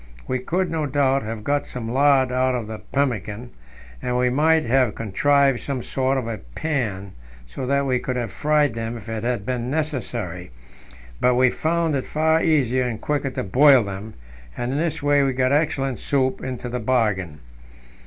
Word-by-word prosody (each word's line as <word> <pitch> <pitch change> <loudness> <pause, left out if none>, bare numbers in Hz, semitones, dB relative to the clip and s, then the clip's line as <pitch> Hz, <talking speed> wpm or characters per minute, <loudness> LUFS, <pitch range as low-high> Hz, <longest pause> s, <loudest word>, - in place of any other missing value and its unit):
We 130 0 -1
could, 175 +7 -1
no 155 -2 -1
doubt, 135 -1 +2
have 110 -1 -6
got 145 +4 0
some 120 -3 -6
lard 135 +1 +3
out 130 0 +1
of 120 -3 -3
the 110 0 -7
pemmican, 120 -4 -2 0.5
and 125 0 -1
we 125 0 +2
might 160 +3 +3
have 125 -2 +2
contrived 135 +5 +2
some 135 -4 -4
sort 135 0 0
of 130 - -2
a 115 -2 -4
pan, 100 - -3 0.3
so 95 - -6
that 140 +1 +1
we 130 -2 +1
could 125 +1 -3
have 120 -5 -3
fried 150 +4 +2
them 115 +1 -4
if 110 -1 -12
it 110 -1 -4
had 120 -4 -1
been 125 -1 -2
necessary; 120 - -3 0.7
but 125 0 +3
we 125 0 +4
found 165 0 0
it 135 - -3
far 160 +1 +2
easier 130 -5 +2
and 115 -3 -3
quicker 145 0 -1
to 130 - -4
boil 130 +5 +6
them, 100 +2 -7 0.4
and 120 +1 -2
in 140 - -1
this 165 -3 -2
way 145 0 +4
we 135 -1 +1
got 130 +1 +1
excellent 140 -4 0
soup 130 -2 0
into 125 -1 -5
the 125 +1 -3
bargain. 105 -10 0
130 Hz, 185 wpm, -22 LUFS, 115-145 Hz, 0.7 s, boil